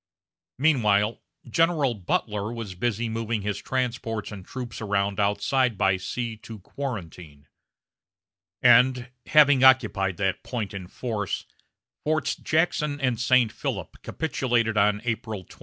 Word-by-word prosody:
Meanwhile, 115 -7 +2 0.3
General 155 -1 +2
Butler 105 +1 -2
was 115 -5 -6
busy 115 +4 -1
moving 115 -1 -2
his 105 -1 -2
transports 120 -5 -3
and 100 -3 -8
troops 120 +2 -7
around 100 -1 -1
outside 115 +4 +1
by 95 -1 +2
sea 115 +4 -4
to 110 +1 -10
Quarantine; 90 - -7 1.2
and, 125 -1 +5 0.2
having 145 -3 +5
occupied 105 -8 +4
that 95 -2 -1
point 110 -7 -4
in 95 -2 -7
force, 105 -1 -4 0.6
Forts 155 -2 0
Jackson 150 -2 0
and 125 -4 0
St. 125 -2 +3
Philip 110 - -5
capitulated 120 -7 -1
on 105 0 +2
April 110 -4 -3
28. - - -18
115 Hz, 125 wpm, -25 LUFS, 100-130 Hz, 1.2 s, and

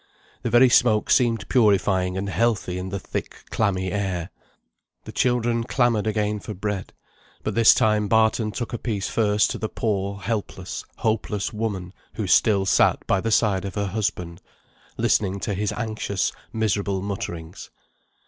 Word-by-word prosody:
The 120 - -2
very 120 +3 +6
smoke 115 -3 +3
seemed 115 -4 +2
purifying 95 -5 +2
and 100 +1 -3
healthy 100 -4 0
in 95 +1 -5
the 100 - -3
thick 90 - -6
clammy 95 -4 0
air. 95 -4 -2 0.7
The - - -9
children 120 -2 +1
clamoured 115 -3 +1
again 105 -1 0
for 105 +1 -7
bread; 100 0 -4 0.5
but - - -2
this 115 -1 +6
time 105 -3 +2
Barton 110 0 +2
took 120 +2 -5
a 120 - -3
piece 105 -5 -2
first 105 -2 +2
to - - -4
the 110 - -3
poor, 100 -2 -2
helpless, 95 -2 -4
hopeless 110 -2 -1
woman, 100 -5 -3 0.2
who 110 - -2
still 95 +2 +3
sat - - +3
by 95 - +1
the 115 - -1
side 105 -4 +2
of 100 - -6
her 100 -1 -1
husband, 95 -4 -3 0.6
listening 100 -1 +1
to 105 - -2
his 105 +2 -1
anxious 110 -4 -2 0.2
miserable 100 -3 -1
mutterings. 95 -4 -6
105 Hz, 155 wpm, -24 LUFS, 95-110 Hz, 0.7 s, very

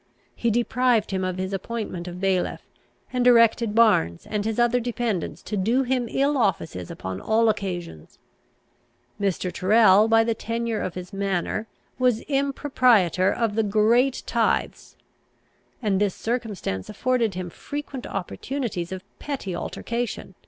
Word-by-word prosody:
He 235 - 0
deprived 240 -1 +1
him 190 -1 -1
of 185 0 -2
his 190 +1 -3
appointment 195 -3 -4
of 175 0 -7
bailiff, 190 -1 0 0.5
and 250 -1 +1
directed 230 -2 +4
Barnes 205 - +3
and 210 -1 -2
his 220 -1 -1
other 240 0 +3
dependents 235 -6 -3
to 215 - -4
do 230 +7 +2
him 250 -1 0
ill 280 +1 +1
offices 165 - -1
upon 95 0 -6
all 225 +1 +3
occasions. 175 - -4 1.0
Mr. 185 -2 -1
Tyrrel, 210 +1 +5
by 225 0 +5
the 230 0 0
tenure 230 0 -3
of 185 - -4
his 180 0 -8
manor, 195 +2 -2 0.3
was 250 -3 +2
impropriator 255 - +2
of 225 -1 0
the 225 - +2
great 220 +5 +2
tithes, - - -1 0.9
and 200 -2 +1
this 205 -3 +1
circumstance 220 - -3
afforded 230 -2 0
him 180 -1 -5
frequent 285 - -6
opportunities 195 -1 -4
of 190 0 -5 0.2
petty 255 -11 -4
altercation. 235 +2 -4
220 Hz, 140 wpm, -24 LUFS, 185-240 Hz, 1.0 s, Tyrrel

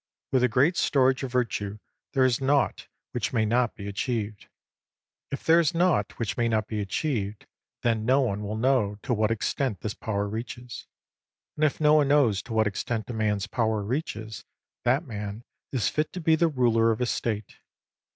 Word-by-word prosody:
With 130 -1 +3
a - - +6
great 135 +9 +2
storage 130 -2 +3
of 135 -3 -4
Virtue 105 -5 -1 0.4
there 130 -2 +4
is 125 0 +1
naught 140 +1 +1 0.2
which 120 0 -2
may 110 -2 +2
not 120 +1 +1
be 100 -1 -7
achieved. 105 0 -3 0.8
If 140 - -5
there 165 +1 +5
is 165 0 +1
naught 170 - +2
which 115 -4 -2
may 120 -1 +2
not 110 -1 0
be 110 -1 -3
achieved, 105 -1 -2 0.4
then 115 -2 +1
no 130 +5 +4
one 105 -5 -1
will 105 +1 -4
know 115 -4 +2
to 125 - 0
what 110 -1 +2
extent 115 0 -1
this 105 - -3
power 100 -2 -2
reaches. 120 +3 -6 0.7
And 155 - -2
if 155 - +2
no 150 -1 +5
one 150 -2 +5
knows 135 -9 +3
to 115 - -8
what 110 0 +3
extent 110 +3 -2
a - - -5
man's 105 -3 0
power 110 -3 0
reaches, 110 -3 -4 0.4
that 130 +7 +2
man 105 -2 -6 0.3
is 120 -9 0
fit 150 - -1
to 185 - -4
be 160 -1 +3
the 170 +1 +3
ruler 120 -6 +3
of 110 - 0
a 125 - +1
State. 110 -3 -3
115 Hz, 190 wpm, -27 LUFS, 105-135 Hz, 0.8 s, a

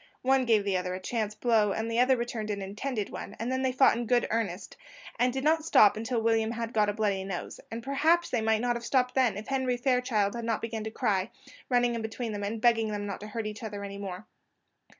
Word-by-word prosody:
One 265 0 +3
gave 220 -4 +3
the 200 -2 0
other 180 0 -3
a - - -5
chance 215 +1 -2
blow, 215 -3 +2
and 220 +1 -2
the 230 +1 0
other 255 +1 +4
returned 235 -2 -4
an 205 -1 -2
intended 210 +3 -4
one, 200 - -7
and 230 +3 -3
then 260 0 0
they 260 -1 +1
fought 260 -1 +5
in 235 0 -3
good 245 0 +3
earnest, 210 -4 -2 0.4
and 250 +1 +3
did 265 +1 -3
not 315 +1 +3
stop 210 -9 +6
till 230 -1 -1
William 225 -1 +2
had 230 0 -4
got 210 -1 +3
a - - -1
bloody 205 -3 0
nose; 190 -2 -5
and 230 +1 -6
perhaps 320 +6 +2
they 240 - +1
might 220 0 +2
not 240 0 +1
have 235 - -5
stopped 250 0 +1
then, 255 -5 +2
if 210 - -7
Henry 260 -2 0
Fairchild 245 -5 +1
had 235 - -5
not 230 -1 0
begun 225 -1 -4
to - - -2
cry, 200 -2 0 0.4
running 245 -1 +3
in 230 - -3
between 220 +1 -4
them, 205 -1 -4
and 215 +3 -3
begging 225 -1 +3
them 205 -1 -3
not 200 -1 -5
to 210 - -8
hurt 220 +1 -4
each 215 0 -5
other 205 -3 -5
any 200 0 -6
more. 195 0 -6
225 Hz, 250 wpm, -29 LUFS, 210-245 Hz, 0.4 s, stop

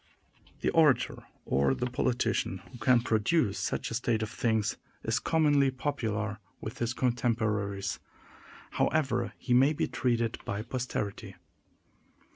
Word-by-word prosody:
The - - +1
orator, 155 -5 +3 0.2
or 70 0 +2
the 125 - -2
politician, 125 0 0
who 125 - -11
can 125 0 +4
produce 115 - +1
such - - -2
a - - -3
state 115 -2 0
of 110 - -5
things, 110 -3 0 0.3
is - - +1
commonly 145 -4 +3
popular 110 -6 -2 0.2
with 110 - -7
his 120 0 -1
contemporaries, 110 -5 0 0.7
however 155 -3 +1
he 125 - -1
may 135 +5 +5
be - - -1
treated 115 -2 0
by 100 +2 -3
posterity. 120 -4 -4
120 Hz, 125 wpm, -30 LUFS, 110-130 Hz, 0.7 s, may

